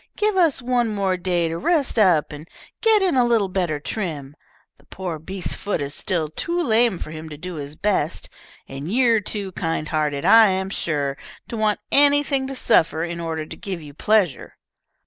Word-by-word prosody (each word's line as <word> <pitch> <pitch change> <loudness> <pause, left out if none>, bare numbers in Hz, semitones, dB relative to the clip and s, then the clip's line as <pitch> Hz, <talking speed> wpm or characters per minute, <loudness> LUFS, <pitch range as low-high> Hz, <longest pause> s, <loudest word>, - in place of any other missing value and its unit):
Give 425 -1 +1
us 325 -8 +2
one 245 -1 +1
more 200 -3 0
day 175 -2 0
to 165 +1 -4
rest 285 - +1
up 180 -7 +3
and 150 +3 -10 0.3
get 440 -3 +4
in 370 - +2
a 250 - +4
little 230 -5 +2
better 175 -5 -1
trim. 150 -6 -5 0.4
The - - -24
poor 180 -4 -5
beast's 185 +4 -4
foot 200 -4 -3
is 140 0 -4
still 170 -3 -1
too 340 - -3
lame 230 - +2
for 155 - -7
him 160 0 -8
to 150 - -9
do 180 +4 -7
his 145 0 -7
best, 185 -5 -1 0.4
and 140 +6 -6
you're 235 -1 +3
too 200 -1 -4
kind 165 -4 -3
hearted, 150 -3 -1
I 225 -1 +8
am 190 0 -1
sure, 140 -6 -2 0.3
to 235 - -5
want 215 -1 0
anything 285 -1 +4
to 270 - -6
suffer 165 -10 +2
in 170 0 -4
order 160 -2 -3
to 160 - -9
give 185 +1 -6
you 150 -3 -11
pleasure." 195 -3 0
185 Hz, 190 wpm, -22 LUFS, 155-230 Hz, 0.4 s, I